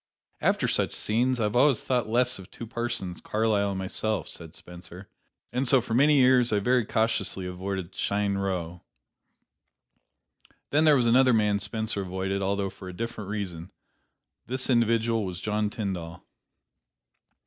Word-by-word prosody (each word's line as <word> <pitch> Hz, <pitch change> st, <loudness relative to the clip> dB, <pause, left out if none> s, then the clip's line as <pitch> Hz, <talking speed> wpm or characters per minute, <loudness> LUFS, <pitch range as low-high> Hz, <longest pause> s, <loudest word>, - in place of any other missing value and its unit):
"After -, -, +2 dB
such -, -, 0 dB
scenes 125 Hz, +4 st, 0 dB
I 105 Hz, -, +2 dB
always 125 Hz, +4 st, +3 dB
thought 125 Hz, -4 st, 0 dB
less 125 Hz, 0 st, +2 dB
of 95 Hz, -, -12 dB
two 115 Hz, -, -8 dB
persons, 115 Hz, -6 st, -3 dB
Carlyle 105 Hz, -2 st, +1 dB
and 100 Hz, -, -3 dB
myself," 100 Hz, +2 st, -2 dB
said 85 Hz, -1 st, -9 dB
Spencer; 90 Hz, +2 st, -11 dB, 0.5 s
"and 125 Hz, +2 st, 0 dB
so 130 Hz, +2 st, +5 dB
for 115 Hz, -1 st, -5 dB
many 145 Hz, +5 st, +5 dB
years 125 Hz, -2 st, +5 dB
I 105 Hz, -, +2 dB
very 120 Hz, +2 st, +1 dB
cautiously 100 Hz, -4 st, 0 dB
avoided 95 Hz, 0 st, -4 dB
Cheyne 100 Hz, -1 st, -1 dB
Row." 90 Hz, -3 st, -3 dB, 1.9 s
Then 155 Hz, +2 st, +3 dB
there 150 Hz, -2 st, +6 dB
was 125 Hz, -, +2 dB
another 125 Hz, +2 st, +5 dB
man 105 Hz, -2 st, +2 dB
Spencer 110 Hz, 0 st, -3 dB
avoided, 95 Hz, +1 st, -3 dB
although 100 Hz, 0 st, -1 dB
for 95 Hz, -, -10 dB
a -, -, -8 dB
different 115 Hz, -4 st, -5 dB
reason; 95 Hz, -5 st, -5 dB, 0.8 s
this 130 Hz, +2 st, -1 dB
individual 115 Hz, -1 st, +2 dB
was 90 Hz, -3 st, -5 dB
John 105 Hz, +1 st, -1 dB
Tyndall. 95 Hz, -7 st, -5 dB
105 Hz, 150 wpm, -27 LUFS, 95-120 Hz, 1.9 s, there